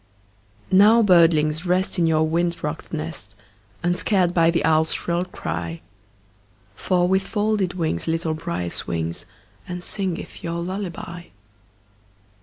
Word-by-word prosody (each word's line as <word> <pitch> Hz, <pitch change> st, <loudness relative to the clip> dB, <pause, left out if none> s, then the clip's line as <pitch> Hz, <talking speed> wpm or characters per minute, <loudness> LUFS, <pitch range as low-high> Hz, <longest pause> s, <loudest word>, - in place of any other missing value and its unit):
Now, 210 Hz, +5 st, +6 dB
birdlings, 165 Hz, -4 st, +4 dB
rest, 185 Hz, +1 st, 0 dB
In 170 Hz, -, +3 dB
your 160 Hz, -1 st, +2 dB
wind 170 Hz, +2 st, -1 dB
rocked 150 Hz, +2 st, -4 dB
nest, 155 Hz, -, -6 dB, 0.5 s
Unscared 180 Hz, +1 st, +1 dB
by 165 Hz, -2 st, +4 dB
the 170 Hz, -2 st, +1 dB
owl's 160 Hz, 0 st, +3 dB
shrill 175 Hz, +1 st, -1 dB
cry; 85 Hz, -, -5 dB, 0.9 s
For 180 Hz, -, +1 dB
with 190 Hz, +1 st, +3 dB
folded 205 Hz, -2 st, -1 dB
wings 160 Hz, -, -2 dB
Little 165 Hz, 0 st, 0 dB
Brier 155 Hz, -, -4 dB
swings, 85 Hz, 0 st, -3 dB, 0.4 s
And 180 Hz, 0 st, -6 dB
singeth 190 Hz, -4 st, -4 dB
your 170 Hz, 0 st, -3 dB
lullaby. 175 Hz, -1 st, -5 dB
170 Hz, 120 wpm, -23 LUFS, 160-185 Hz, 0.9 s, Now